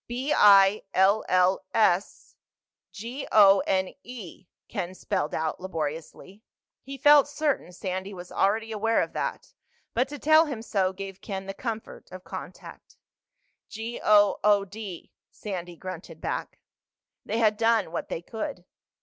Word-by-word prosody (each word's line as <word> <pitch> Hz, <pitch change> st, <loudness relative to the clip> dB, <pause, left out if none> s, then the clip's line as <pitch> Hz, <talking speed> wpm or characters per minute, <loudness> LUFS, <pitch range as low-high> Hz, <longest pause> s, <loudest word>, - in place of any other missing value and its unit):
"B 255 Hz, +5 st, -2 dB
I 200 Hz, 0 st, +6 dB
L 195 Hz, +3 st, +4 dB
L 185 Hz, +1 st, +3 dB
S 200 Hz, -4 st, +1 dB, 0.6 s
G 240 Hz, +7 st, -7 dB
O 200 Hz, -2 st, +7 dB
N 190 Hz, -1 st, 0 dB
E," 210 Hz, -, -10 dB, 0.2 s
Ken 180 Hz, +1 st, -5 dB
spelled 185 Hz, -6 st, -2 dB
out 160 Hz, -1 st, -2 dB
laboriously. 165 Hz, +3 st, -6 dB, 0.4 s
He 275 Hz, +1 st, -8 dB
felt 290 Hz, +1 st, +6 dB
certain 290 Hz, -, -2 dB
Sandy 185 Hz, +2 st, -5 dB
was 180 Hz, -2 st, -10 dB
already 220 Hz, +3 st, 0 dB
aware 225 Hz, +1 st, +1 dB
of -, -, -8 dB
that, -, -, -4 dB, 0.4 s
but 250 Hz, +3 st, +1 dB
to 290 Hz, +2 st, -7 dB
tell 315 Hz, +2 st, +5 dB
him 240 Hz, -6 st, -5 dB
so 195 Hz, -5 st, 0 dB
gave 195 Hz, 0 st, -8 dB
Ken 195 Hz, -2 st, -5 dB
the 195 Hz, -, -5 dB
comfort 225 Hz, 0 st, -7 dB
of 185 Hz, 0 st, -10 dB
contact. -, -, -10 dB, 0.7 s
"G 225 Hz, +2 st, -6 dB
O 205 Hz, -1 st, +5 dB
O 205 Hz, -1 st, +4 dB
D," 200 Hz, -3 st, -9 dB, 0.2 s
Sandy 180 Hz, -4 st, -7 dB
grunted 170 Hz, -2 st, -9 dB
back. -, -, -4 dB, 0.7 s
They 225 Hz, -, -3 dB
had 215 Hz, -2 st, +3 dB
done 225 Hz, -5 st, +2 dB
what 170 Hz, -, -4 dB
they 165 Hz, -, -4 dB
could. 185 Hz, -3 st, -6 dB
200 Hz, 145 wpm, -26 LUFS, 185-225 Hz, 0.7 s, O